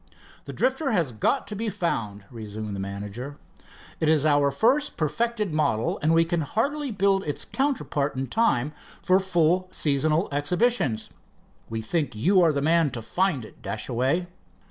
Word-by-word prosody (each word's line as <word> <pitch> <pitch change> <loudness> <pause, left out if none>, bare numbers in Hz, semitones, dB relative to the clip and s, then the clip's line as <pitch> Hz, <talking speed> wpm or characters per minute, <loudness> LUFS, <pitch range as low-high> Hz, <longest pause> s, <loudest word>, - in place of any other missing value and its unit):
"The - - -6
Drifter 265 +1 0
has 165 -10 +1
got 110 - 0
to 210 - -6
be 220 +2 -2
found," 115 - -3
resumed 110 -2 -6
the - - -5
manager. 105 +8 -6 0.6
"It 155 - +2
is 155 -2 +3
our 145 -2 +4
first 260 - +1
perfected 210 +4 -1
model, 140 -8 0
and 155 +2 +2
we 165 0 +4
can 170 0 0
hardly 280 - -1
build 195 -2 +2
its 145 - -3
counterpart 150 - -1
in 130 +1 -2
time 150 - +1 0.3
for 185 +1 +4
full 185 -1 +2
seasonal 155 +1 +1
exhibitions. 145 - 0 0.6
We 110 0 -4
think 145 0 -1
you 185 - +3
are 165 -2 +5
the 140 -1 -1
man 165 0 +3
to - - -4
find 175 - 0
it, - - -16
Dashaway." 125 - -1
155 Hz, 160 wpm, -25 LUFS, 130-195 Hz, 0.6 s, are